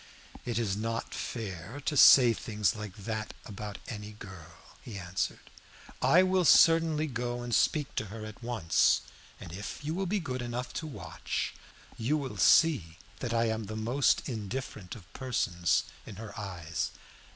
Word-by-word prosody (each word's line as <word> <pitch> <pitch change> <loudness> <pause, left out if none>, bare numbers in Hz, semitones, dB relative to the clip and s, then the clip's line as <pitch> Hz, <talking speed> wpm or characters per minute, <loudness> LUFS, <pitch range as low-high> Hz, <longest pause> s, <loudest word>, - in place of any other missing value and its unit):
"It 120 -2 -2
is 105 -5 0
not 115 +2 -3
fair 100 +1 -5
to 150 - 0
say 125 -4 +8
things 105 0 -1
like 105 -3 -7
that 110 +1 -4
about 105 -1 -7
any 105 -2 -6
girl," 95 -5 -11 0.2
he 110 -5 -8
answered. 95 +1 -4 0.5
"I 180 +2 +6
will 185 0 +2
certainly 165 0 +5
go 120 -3 -3
and 120 -1 -4
speak 150 +3 +2
to - - 0
her 110 +2 -8
at 110 +2 -10
once, 115 -8 +2 0.4
and - - -9
if 100 +8 -6
you 155 - -1
will 190 +2 -2
be 205 +3 0
good 130 -7 -4
enough 120 +1 -4
to 160 - -6
watch, 145 - -4 0.5
you 130 +7 +1
will 140 -3 -5
see 110 - +4 0.2
that 125 - -3
I 115 0 +2
am 110 -1 -2
the 110 +2 -6
most 120 +6 +1
indifferent 110 -4 -5
of 100 -3 -15
persons 90 -9 0 0.2
in - - -8
her 110 -2 -8
eyes." 90 -6 -4
115 Hz, 165 wpm, -30 LUFS, 100-130 Hz, 0.5 s, say